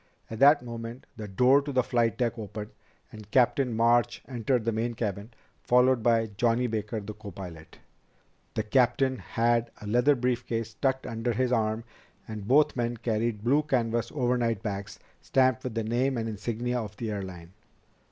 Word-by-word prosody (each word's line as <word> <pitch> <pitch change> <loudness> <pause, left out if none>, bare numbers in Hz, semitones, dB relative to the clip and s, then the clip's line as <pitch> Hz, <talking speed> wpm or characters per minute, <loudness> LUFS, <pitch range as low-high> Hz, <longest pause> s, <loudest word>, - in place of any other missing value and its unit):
At 110 - -5
that 145 0 +6
moment 115 +1 -7
the 105 -2 -7
door 125 +8 +4
to 145 0 -5
the 130 -2 +2
flight 115 -3 +1
deck 120 -2 -1
opened 105 0 -6 0.4
and 110 -1 -11
Captain 130 +2 +3
March 115 +1 +2
entered 125 -1 -1
the 115 - +2
main 115 +2 -2
cabin, 105 -1 -3 0.3
followed 125 0 +4
by 115 -1 +2
Johnny 120 +2 +2
Baker, 110 -1 -2
the 105 +1 -7
copilot. 90 -6 -10 0.8
The 110 - 0
captain 130 +3 +2
had 115 0 +1
a - - -10
leather 120 +7 +3
brief 125 -1 0
case 115 -1 -3
tucked 130 +3 -1
under 115 +1 -2
his 125 +2 0
arm 110 -1 0 0.4
and 105 -2 -7
both 150 +4 +4
men 120 -1 -1
carried 115 -1 -1
blue 140 +6 +3
canvas 120 -5 -1
overnight 120 -5 0
bags 100 -2 -4 0.2
stamped 130 -1 +2
with 125 -3 -5
the 115 - 0
name 125 +4 0
and 115 -1 -2
insignia 115 +3 -2
of 105 -2 -8
the 110 -1 -3
airline. 95 -4 -7
115 Hz, 170 wpm, -28 LUFS, 110-125 Hz, 0.8 s, that